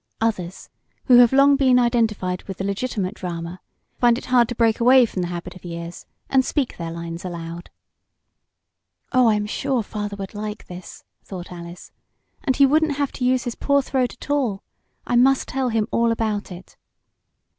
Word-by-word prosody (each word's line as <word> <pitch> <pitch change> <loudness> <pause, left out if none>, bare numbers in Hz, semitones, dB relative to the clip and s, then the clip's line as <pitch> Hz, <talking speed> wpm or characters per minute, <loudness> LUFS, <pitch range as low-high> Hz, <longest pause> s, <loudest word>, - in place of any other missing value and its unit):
Others, 190 -5 -3 0.3
who 250 -2 +7
have 240 -2 +7
long 275 +1 +5
been 260 -2 +4
identified 225 -7 +1
with 195 -2 -7
the - - -4
legitimate 200 -1 -2
drama, 175 -2 -6 0.4
find 240 -1 +4
it - - -8
hard 240 -2 +5
to 245 - -4
break 225 -1 +2
away 250 +1 +6
from 195 -4 -4
the 175 - -2
habit 175 +1 -6
of 185 - -14
years 170 0 -7 0.2
and 265 -1 +3
speak 270 -1 -1
their 170 -1 -5
lines 170 0 -6
aloud. 170 -1 -7 1.4
"Oh, 255 -3 +4
I'm 210 -1 +1
sure 255 +2 -1
father 205 -1 -5
would 195 -1 -7
like 210 +1 -6
this," 180 0 -10 0.2
thought 180 -2 -8
Alice. 175 0 -10 0.5
"And 265 -4 +1
he 280 - +6
wouldn't 300 +1 +2
have 285 -2 -1
to 255 - -6
use 255 0 +2
his 240 - -3
poor 280 +2 +1
throat 255 -2 -1
at - - -8
all. 245 -9 0 0.4
I 245 - -1
must 265 +2 +4
tell 265 -1 -1
him 225 -2 0
all 230 0 +2
about 215 -3 -2
it." 180 +1 -12
225 Hz, 180 wpm, -22 LUFS, 180-255 Hz, 1.4 s, who